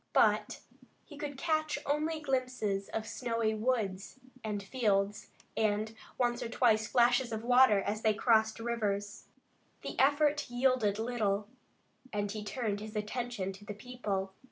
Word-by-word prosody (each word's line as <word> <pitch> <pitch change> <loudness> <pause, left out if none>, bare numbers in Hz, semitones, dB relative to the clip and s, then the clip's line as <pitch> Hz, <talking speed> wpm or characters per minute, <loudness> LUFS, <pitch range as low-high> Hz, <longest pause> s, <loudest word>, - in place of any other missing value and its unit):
But - - +3 0.4
he 300 - -12
could 285 -1 -5
catch 310 0 0
only 310 +2 0
glimpses 255 -8 -1
of 220 0 -3
snowy 230 -3 -1
woods 215 -2 -1 0.2
and 210 -2 -3
fields, 205 -3 0 0.3
and, 215 0 0 0.2
once 240 0 +1
or 235 - -3
twice, 220 -3 +3
flashes 245 +1 +3
of 220 0 -3
water 245 -3 +6
as 215 +2 -2
they 215 -1 +3
crossed 220 0 +3
rivers. 205 -3 -2 0.6
The - - -5
effort 290 +1 +3
yielded 245 -4 +2
little, 215 -3 -1 0.6
and 205 -1 -1
he 210 0 -5
turned 210 -2 -2
his 215 +1 -8
attention 210 -2 -3
to 195 +2 -13
the 205 0 -6
people. 205 -5 -4
225 Hz, 140 wpm, -32 LUFS, 210-255 Hz, 0.6 s, water